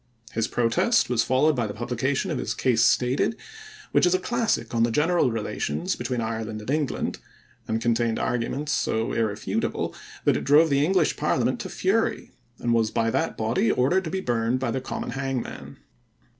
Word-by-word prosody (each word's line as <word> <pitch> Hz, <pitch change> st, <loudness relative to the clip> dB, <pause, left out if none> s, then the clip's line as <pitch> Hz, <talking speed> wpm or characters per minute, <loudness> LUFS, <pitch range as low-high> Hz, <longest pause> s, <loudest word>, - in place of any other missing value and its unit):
His 110 Hz, 0 st, -1 dB
protest 115 Hz, +1 st, +2 dB
was 120 Hz, -2 st, +3 dB
followed 140 Hz, +6 st, +3 dB
by 120 Hz, -3 st, 0 dB
the 100 Hz, -, -6 dB
publication 130 Hz, -, -1 dB
of 150 Hz, -, -2 dB
his -, -, -3 dB
Case 120 Hz, -3 st, +2 dB
Stated, 125 Hz, -, +2 dB, 0.6 s
which -, -, +4 dB
is 180 Hz, -, +3 dB
a -, -, +1 dB
classic 235 Hz, -, -1 dB
on 115 Hz, -, +1 dB
the 115 Hz, -, +4 dB
general 150 Hz, +4 st, +2 dB
relations 115 Hz, -, -2 dB
between 125 Hz, 0 st, -3 dB
Ireland 110 Hz, -1 st, -3 dB
and 105 Hz, +5 st, -5 dB
England, 150 Hz, -3 st, -1 dB, 0.5 s
and 110 Hz, 0 st, 0 dB
contained 115 Hz, 0 st, +1 dB
arguments 130 Hz, +4 st, -2 dB
so 115 Hz, -2 st, 0 dB
irrefutable 110 Hz, -2 st, -1 dB, 0.3 s
that -, -, +4 dB
it -, -, -4 dB
drove 150 Hz, +2 st, +5 dB
the 140 Hz, 0 st, +3 dB
English 185 Hz, +4 st, +2 dB
parliament -, -, 0 dB
to -, -, -5 dB
fury -, -, 0 dB, 0.3 s
and 120 Hz, -, 0 dB
was 115 Hz, -2 st, +2 dB
by 115 Hz, +1 st, 0 dB
that -, -, -1 dB
body 115 Hz, +1 st, +1 dB
ordered 170 Hz, +10 st, +2 dB
to -, -, -3 dB
be 190 Hz, +3 st, -2 dB
burned 120 Hz, -2 st, 0 dB
by 130 Hz, -3 st, -1 dB
the 130 Hz, -, -2 dB
common -, -, -5 dB
hangman. 135 Hz, -2 st, -4 dB
125 Hz, 180 wpm, -25 LUFS, 115-145 Hz, 0.6 s, drove